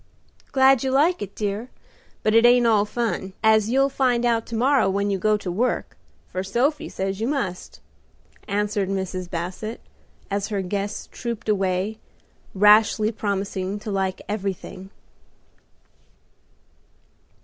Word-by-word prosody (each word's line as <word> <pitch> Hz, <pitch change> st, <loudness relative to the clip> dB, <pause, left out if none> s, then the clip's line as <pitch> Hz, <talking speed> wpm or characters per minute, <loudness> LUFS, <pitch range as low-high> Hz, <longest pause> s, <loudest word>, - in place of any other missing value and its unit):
"Glad 265 Hz, -1 st, +5 dB
you 265 Hz, -, 0 dB
like 295 Hz, +5 st, +2 dB
it, 200 Hz, -1 st, -6 dB
dear. 210 Hz, +3 st, -3 dB, 0.5 s
But 215 Hz, -, +2 dB
it 230 Hz, +1 st, +6 dB
ain't 240 Hz, 0 st, +6 dB
all 215 Hz, -3 st, +4 dB
fun, 210 Hz, -4 st, -3 dB
as 220 Hz, -1 st, +4 dB
you'll 270 Hz, +3 st, +3 dB
find 255 Hz, -3 st, +1 dB
out 230 Hz, -1 st, +1 dB
to 230 Hz, -, -5 dB
morrow 260 Hz, -2 st, +3 dB
when 200 Hz, +1 st, 0 dB
you 195 Hz, -, -1 dB
go 215 Hz, +2 st, +2 dB
to 190 Hz, -3 st, -5 dB
work, 235 Hz, +8 st, -1 dB, 0.4 s
for 185 Hz, -, -2 dB
Sophie 245 Hz, +10 st, 0 dB
says 195 Hz, +1 st, -3 dB
you 225 Hz, -, 0 dB
must," 205 Hz, -11 st, -3 dB, 0.7 s
answered 205 Hz, -1 st, -1 dB
Mrs. 185 Hz, -2 st, -3 dB
Basset, 185 Hz, +6 st, -5 dB, 0.5 s
as 200 Hz, 0 st, -1 dB
her 200 Hz, -3 st, -2 dB
guests 200 Hz, +2 st, -3 dB
trooped 235 Hz, -2 st, -5 dB
away, 195 Hz, +1 st, 0 dB, 0.6 s
rashly 210 Hz, +2 st, +5 dB
promising 200 Hz, -2 st, -3 dB
to 210 Hz, -, -5 dB
like 190 Hz, -1 st, -2 dB
everything. 195 Hz, -2 st, -5 dB
210 Hz, 135 wpm, -23 LUFS, 195-235 Hz, 0.7 s, it